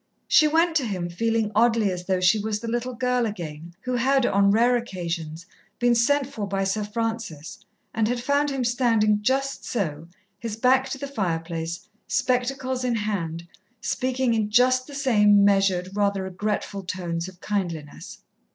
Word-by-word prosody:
She 310 Hz, -, +6 dB
went 325 Hz, +2 st, +2 dB
to 275 Hz, -, -1 dB
him 180 Hz, -4 st, -3 dB
feeling 225 Hz, +4 st, 0 dB
oddly 225 Hz, -2 st, +3 dB
as 180 Hz, -1 st, -6 dB
though 190 Hz, -1 st, +1 dB
she 180 Hz, +4 st, +4 dB
was 210 Hz, 0 st, -2 dB
the 230 Hz, -, -7 dB
little 240 Hz, +2 st, -2 dB
girl 250 Hz, 0 st, +1 dB
again, 170 Hz, -4 st, -7 dB
who 250 Hz, 0 st, -2 dB
had, 265 Hz, +1 st, +2 dB
on 200 Hz, -2 st, +3 dB
rare 235 Hz, +4 st, +4 dB
occasions, 170 Hz, -7 st, -4 dB, 0.3 s
been 245 Hz, 0 st, +3 dB
sent 275 Hz, +5 st, +2 dB
for 220 Hz, -6 st, -5 dB
by 195 Hz, 0 st, -1 dB
Sir 195 Hz, +2 st, -1 dB
Francis, 225 Hz, -8 st, -4 dB, 0.3 s
and 220 Hz, -1 st, +1 dB
had 245 Hz, +1 st, -1 dB
found 285 Hz, +4 st, +1 dB
him 270 Hz, -2 st, -2 dB
standing 230 Hz, -4 st, +2 dB
just 270 Hz, +5 st, 0 dB
so, 165 Hz, -8 st, -3 dB, 0.3 s
his 230 Hz, -1 st, -4 dB
back 260 Hz, +3 st, +3 dB
to 270 Hz, -, -4 dB
the 280 Hz, -, -5 dB
fireplace, 170 Hz, -8 st, -3 dB, 0.2 s
spectacles 255 Hz, 0 st, 0 dB
in 245 Hz, -2 st, 0 dB
hand, 170 Hz, -6 st, -3 dB, 0.3 s
speaking 255 Hz, 0 st, 0 dB
in 215 Hz, -2 st, 0 dB
just 255 Hz, +3 st, +3 dB
the 285 Hz, -, -9 dB
same 210 Hz, -7 st, +4 dB
measured, 195 Hz, -2 st, +2 dB
rather 200 Hz, -1 st, 0 dB
regretful 200 Hz, +1 st, -3 dB
tones 175 Hz, -2 st, -4 dB
of 185 Hz, -2 st, -12 dB
kindliness. 175 Hz, -8 st, -5 dB
215 Hz, 165 wpm, -24 LUFS, 185-250 Hz, 0.3 s, She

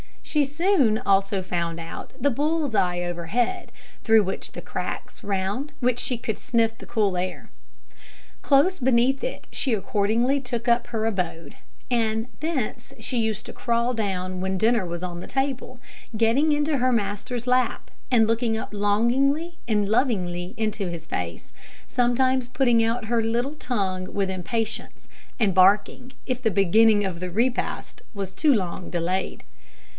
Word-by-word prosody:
She 300 Hz, -2 st, +1 dB
soon 290 Hz, -, +2 dB
also 195 Hz, -1 st, +1 dB
found 170 Hz, -2 st, -2 dB
out 165 Hz, 0 st, -8 dB
the 285 Hz, +3 st, +3 dB
bull's 295 Hz, +1 st, 0 dB
eye 180 Hz, -3 st, +1 dB
overhead, 175 Hz, -, -2 dB, 0.4 s
through 220 Hz, -2 st, +6 dB
the 190 Hz, 0 st, -5 dB
cracks -, -, -6 dB
round 200 Hz, +9 st, -2 dB
which 245 Hz, -1 st, +2 dB
she 250 Hz, -, -2 dB
could 220 Hz, -2 st, -3 dB
sniff 225 Hz, -2 st, +1 dB
the -, -, -11 dB
cool 205 Hz, -5 st, 0 dB
air. 185 Hz, +1 st, -4 dB, 0.9 s
Close 295 Hz, +7 st, +3 dB
beneath 260 Hz, +1 st, +2 dB
it -, -, -5 dB
she 260 Hz, -, 0 dB
accordingly 220 Hz, +6 st, +1 dB
took 245 Hz, -2 st, -4 dB
up 235 Hz, +1 st, +3 dB
her 225 Hz, -2 st, -2 dB
abode; 175 Hz, -7 st, -3 dB, 0.3 s
and 225 Hz, -1 st, +1 dB
thence 270 Hz, -7 st, -3 dB
she 240 Hz, +2 st, -2 dB
used 220 Hz, -2 st, -1 dB
to -, -, -8 dB
crawl 235 Hz, +1 st, 0 dB
down 185 Hz, -4 st, -2 dB
when 190 Hz, +1 st, -1 dB
dinner 225 Hz, 0 st, +2 dB
was 175 Hz, 0 st, -5 dB
on 175 Hz, -1 st, -4 dB
the -, -, -8 dB
table, 270 Hz, -2 st, -2 dB, 0.4 s
getting 235 Hz, +8 st, +3 dB
into 295 Hz, 0 st, +1 dB
her 255 Hz, 0 st, +2 dB
master's 225 Hz, +3 st, -2 dB
lap, 250 Hz, 0 st, +1 dB, 0.2 s
and 235 Hz, -4 st, +5 dB
looking 225 Hz, 0 st, +1 dB
up -, -, -5 dB
longingly 260 Hz, +11 st, +1 dB
and 210 Hz, -3 st, +1 dB
lovingly 185 Hz, -7 st, 0 dB
into 215 Hz, -3 st, -1 dB
his 170 Hz, -2 st, -6 dB
face, 85 Hz, -, -5 dB, 0.4 s
sometimes 255 Hz, +1 st, +2 dB
putting 245 Hz, -2 st, +3 dB
out 230 Hz, +1 st, 0 dB
her 230 Hz, +1 st, +1 dB
little 235 Hz, +5 st, 0 dB
tongue 190 Hz, -10 st, -2 dB
with 195 Hz, -1 st, 0 dB
impatience, 220 Hz, +5 st, -4 dB, 0.3 s
and 205 Hz, -5 st, +3 dB
barking, 205 Hz, +7 st, +3 dB
if 255 Hz, -1 st, -2 dB
the 225 Hz, -, +2 dB
beginning 205 Hz, +2 st, +4 dB
of 185 Hz, -3 st, -3 dB
the 180 Hz, 0 st, -4 dB
repast 235 Hz, +7 st, -1 dB
was 195 Hz, -3 st, -4 dB
too 290 Hz, +9 st, +3 dB
long 185 Hz, -4 st, -2 dB
delayed. 180 Hz, +2 st, -2 dB
225 Hz, 150 wpm, -25 LUFS, 195-255 Hz, 0.9 s, through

